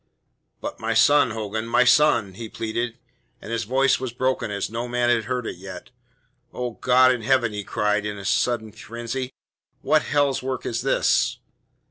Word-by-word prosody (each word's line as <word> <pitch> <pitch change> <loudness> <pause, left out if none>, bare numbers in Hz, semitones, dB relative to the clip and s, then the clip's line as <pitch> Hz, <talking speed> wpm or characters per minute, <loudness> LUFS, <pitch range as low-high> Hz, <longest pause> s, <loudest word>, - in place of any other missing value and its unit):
"But - - -6
my 115 0 -1
son, 145 +3 +5
Hogan, 110 0 -4
my 115 - +4
son?" 120 -5 +4
he 110 +3 -8
pleaded, 115 +2 -3 0.4
and 110 - -9
his 115 -2 -1
voice 135 +4 +2
was 130 -2 -4
broken 130 -1 -1
as 100 -1 -2
no 115 +3 -4
man 120 0 +1
had 115 -2 +1
heard 125 0 -2
it - - -5
yet. 95 +1 -10 0.6
"Oh, 125 -1 -4
God 130 +2 +4
in 125 - -4
heaven!" 120 -2 +2
he 105 0 -4
cried 105 +1 0
in 105 -1 -4
a 100 - -9
sudden 120 -1 0
frenzy. 120 +4 -6 0.5
"What 155 +2 +3
hell's 145 -2 +1
work 130 -1 -4
is 115 - -2
this?" - - +2
120 Hz, 175 wpm, -23 LUFS, 110-130 Hz, 0.6 s, son